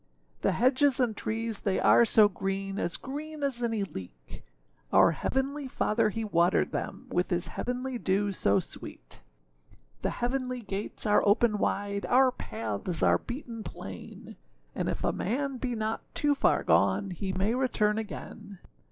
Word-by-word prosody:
The - - +2
hedges 260 +2 +3
and 240 -4 +1
trees 225 0 -2
they 195 -2 0
are 235 - +6
so 215 -1 +6
green, 195 0 -3
As 170 - -1
green 300 +2 -6
as 265 -4 -1
any 225 -3 0
leek; 90 - -9 0.5
Our - - +6
heavenly 270 - -2
Father 225 -3 +1
he 225 +2 -3
watered 175 -4 +2
them - - -4
With 180 +1 +1
his 175 0 -1
heavenly 250 0 -3
dew 200 +1 +1
so 100 - +2
sweet. - - -10 0.8
The - - 0
heavenly 250 0 -2
gates 200 +2 -5
are 210 -1 +4
open 210 +1 +3
wide, 200 0 -1
Our 260 +1 +5
paths 110 - -4
are - - +5
beaten 240 -3 -6
plain; 95 - -9 0.4
And - - -2
if - - -3
a - - +1
man 270 +5 -2
be 245 -1 -2
not 220 0 -2
too 290 -1 +2
far 280 - +2
gone, 95 - +3
He 190 +2 -3
may 190 +4 0
return 220 -4 +1
again. 210 -1 -8
215 Hz, 155 wpm, -29 LUFS, 195-250 Hz, 0.8 s, are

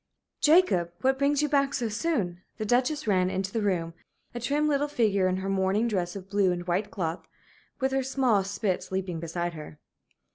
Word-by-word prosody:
XX - - -56
"Jacob, 300 - +4
what 265 +1 +2
brings 285 +1 +2
you - - +2
back 280 -1 +1
so 240 -4 -1
soon?" 210 - -1 0.2
The 215 - -3
Duchess 255 +7 +1
ran 185 -3 +2
into 190 +1 -3
the 225 - 0
room, 175 -5 -1 0.4
a 240 - -4
trim 290 +5 +1
little 290 0 +1
figure 210 -9 +2
in 185 0 0
her 190 +1 -4
morning 195 +4 +1
dress 180 -5 -2
of 190 -1 -8
blue 195 -2 +2
and 175 0 -3
white 180 +4 -1
cloth, 165 -3 -4 0.5
with 265 0 0
her 270 0 +1
small 255 -6 +2
spitz 195 -1 -2
leaping 185 -3 -2
beside 170 +1 -3
her. 150 -1 -9
200 Hz, 195 wpm, -27 LUFS, 185-265 Hz, 0.5 s, Jacob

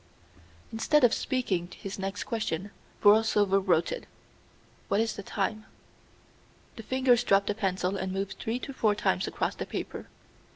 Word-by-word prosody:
Instead 275 +6 +2
of 245 - +6
speaking 205 -10 -1
his 195 0 -6
next 195 +1 -3
question, 205 -4 -3 0.3
Borlsover 205 -2 +5
wrote 175 -3 +2
it. - - -5 0.8
"What 200 - +1
is 225 0 0
the - - -6
time?" 215 +2 -3 1.1
The - - -7
fingers 250 +1 +2
dropped 200 -3 +3
the 210 - 0
pencil 190 -2 -1
and 190 0 -3
moved 195 +1 -3
three 230 +3 -2
or 275 - -6
four 215 -5 +2
times 210 - 0
across - - -1
the - - -6
paper. - - -5
205 Hz, 155 wpm, -28 LUFS, 195-225 Hz, 1.1 s, of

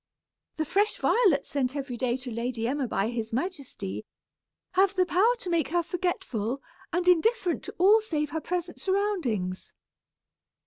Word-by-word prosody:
The 315 - 0
fresh 405 +7 +1
violets 390 - +3
sent 270 -1 -1
every 270 -3 -3
day 245 0 0
to 255 -1 -7
Lady 230 0 -2
Emma 270 0 -1
by 210 -1 0
his 230 -2 -3
majesty, 255 - -4 0.7
have 385 +1 +3
the 370 -1 +3
power 390 +8 +3
to 365 - -6
make 330 -5 +2
her 345 +4 +1
forgetful, 275 - -2 0.3
and 355 +1 0
indifferent 365 +1 +3
to - - -8
all 410 +5 +6
save 305 -8 -2
her 320 - -2
present 350 0 -3
surroundings." 345 - -1
320 Hz, 150 wpm, -28 LUFS, 245-370 Hz, 0.7 s, all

